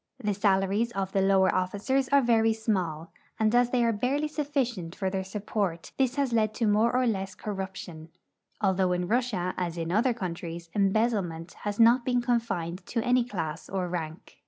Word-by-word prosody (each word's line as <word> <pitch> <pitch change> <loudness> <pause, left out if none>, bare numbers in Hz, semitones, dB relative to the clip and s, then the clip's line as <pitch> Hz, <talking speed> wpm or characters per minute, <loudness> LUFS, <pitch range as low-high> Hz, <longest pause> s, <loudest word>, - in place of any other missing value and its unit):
The 210 -5 -1
salaries 200 +3 +1
of 195 -2 -2
the 195 - +1
lower 190 -1 +4
officers 210 +9 0
are 280 -1 +4
very 225 -2 +3
small, 180 -8 -2 0.3
and 220 0 +2
as 245 0 +4
thej'' 245 -1 +2
are 230 - +3
barely 270 +8 0
sufficient 265 - -2
for 190 -2 -2
their 190 0 -2
support 195 -3 -3
this 260 -1 +2
has 275 -4 0
led 215 -1 +1
to 230 - 0
more 215 +3 +3
or 255 +1 +2
less 195 -4 -2
corruption, 190 -5 -6 0.5
although 190 -3 +2
in 180 0 -1
Russia, 215 -6 0
as 175 -2 -2
in 165 0 -3
other 230 +5 +2
countries, 170 -4 -6
embezzle 215 +2 +2
ment 165 -1 -7
has 205 +1 -2
not 235 +2 +6
been 245 0 +1
confined 200 -8 -1
to 230 -2 -1
any 245 0 +3
class 165 -10 -5
or 185 -2 -2
rank. 165 -2 -6
205 Hz, 180 wpm, -28 LUFS, 185-235 Hz, 0.5 s, not